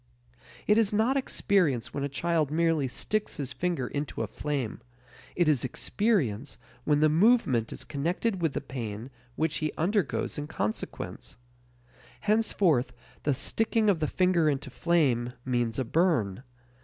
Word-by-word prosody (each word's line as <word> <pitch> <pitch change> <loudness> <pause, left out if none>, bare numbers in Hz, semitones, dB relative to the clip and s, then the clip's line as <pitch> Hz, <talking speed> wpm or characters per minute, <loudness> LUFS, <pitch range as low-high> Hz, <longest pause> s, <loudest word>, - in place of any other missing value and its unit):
It 210 +1 +4
is 215 -3 +2
not 220 +6 +2
experience 185 - +1
when 140 - -2
a 140 - -1
child 160 +1 0
merely 160 -2 +2
sticks 210 - -2
his 140 -3 -4
finger 175 -7 -1
into 145 -5 -3
a - - -3
flame; 135 +1 -3 0.5
it 175 -2 +2
is 150 -5 +3
experience 140 - 0 0.3
when 150 -1 +3
the 155 - +6
movement 155 - +3
is - - -6
connected 175 +7 -1
with 165 -4 +1
the - - -2
pain 120 -2 -6 0.2
which 155 -1 0
he 155 -1 -1
undergoes 185 -2 0
in 145 - -4
consequence. 110 -8 -4 0.8
Henceforth 205 - +2 0.3
the 145 -2 +1
sticking 220 - +1
of 175 - -1
the 155 - 0
finger 180 -3 +2
into 140 -1 -3
flame 130 -7 +1
means 120 -3 0
a 130 - 0
burn. 125 - +1
155 Hz, 145 wpm, -28 LUFS, 130-185 Hz, 0.8 s, the